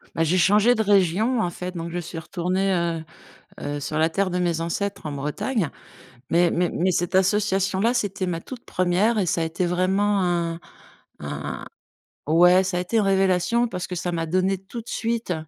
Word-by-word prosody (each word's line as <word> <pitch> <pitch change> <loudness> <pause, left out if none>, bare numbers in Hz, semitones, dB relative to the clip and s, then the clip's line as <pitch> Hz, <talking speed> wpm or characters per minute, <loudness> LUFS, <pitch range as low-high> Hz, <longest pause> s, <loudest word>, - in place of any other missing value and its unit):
Bah, 165 - +2
j'ai 180 +4 +2
changé 210 +6 +4
de 220 - 0
région, 205 +5 +2
en 180 - +1
fait, 180 +1 -6
donc 165 +1 -4
je 175 - -3
suis 165 0 -7
retournée, 185 +3 -1
heu 170 -2 -1 0.6
heu, 145 0 -3
sur 150 +2 -3
la 160 +1 +3
terre 190 +2 0
de 180 - -1
mes 170 -2 0
ancêtres, 180 +3 -3
en 150 - -3
Bretagne. 150 - -2 0.6
Mais 170 +1 +4
mais 175 0 +1
mais 185 +2 0
cette 175 0 -1
association-là, 195 +3 +2
c'était 200 -4 -1
ma 170 -2 -2
toute 250 +4 -10
1re 185 +5 +1
et 185 - 0
ça 165 0 0
a - - +1
été 165 +2 -2
vraiment 190 +3 +1
un 170 -1 -1 0.6
un - - -5 0.6
ouais, 180 +4 +6
ça 185 -1 -2
a - - +1
été 180 +6 -4
une 215 - +3
révélation 195 +4 +2
parce 180 -4 -5
que 180 - -5
ça 175 0 -3
m'a 165 -1 -1
donné 185 +3 +1
tout 195 +5 -9
de - - -22
suite, 230 -4 -2
180 Hz, 200 wpm, -24 LUFS, 170-200 Hz, 0.6 s, ouais